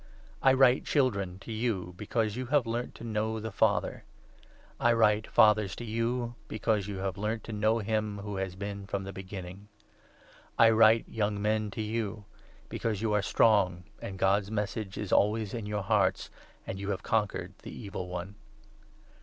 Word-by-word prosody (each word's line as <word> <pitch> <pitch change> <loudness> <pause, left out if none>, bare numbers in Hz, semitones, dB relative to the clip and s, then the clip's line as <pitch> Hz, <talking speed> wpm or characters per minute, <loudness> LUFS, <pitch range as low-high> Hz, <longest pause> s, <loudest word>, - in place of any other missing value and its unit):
I 135 - +6
write, 130 0 +5
Children, 100 -10 +1
to 115 - -8
you, 110 -6 -2
be 105 +3 -8
cause 110 -2 0
you 130 0 -4
have 140 -1 +3
learnt 120 +2 -3
to - - -10
know 110 0 -1
the 110 +1 -5
Father. - - +1 0.8
I 120 0 +4
write, 110 -2 +3
Fathers, 105 -2 +4
to - - -7
14 110 -1 -5
you, 120 +1 -1
because 110 -2 0
you 100 -2 -4
have 95 0 -3
learnt 110 +2 -2
to 115 - -7
know 110 +2 +2
him 110 -1 -1
who 100 0 -5
has 95 -1 -3
been 100 0 -6
from 100 0 -2
the 100 0 -7
Beginning. 95 +1 -8 0.9
I 115 -1 +7
write, 110 0 +5
Young 105 -2 -1
Men, 105 0 0
to 105 +2 -4
you, 105 -1 -3 0.4
because 110 -2 -2
you 110 -2 +1
are 105 - +3
strong, 95 -5 +3 0.2
and 95 - -6
God's 95 +1 +2
Message 105 -1 -3
is 105 - -4
always 105 0 +2
in 115 -3 -4
your 105 -1 -2
hearts, 95 -2 +1 0.3
and 95 - -5
you 100 0 -4
have 100 -2 -2
conquered 105 -4 -1
the - - -9
Evil 100 -4 -6
One. 90 +2 -5
105 Hz, 180 wpm, -30 LUFS, 100-115 Hz, 0.9 s, I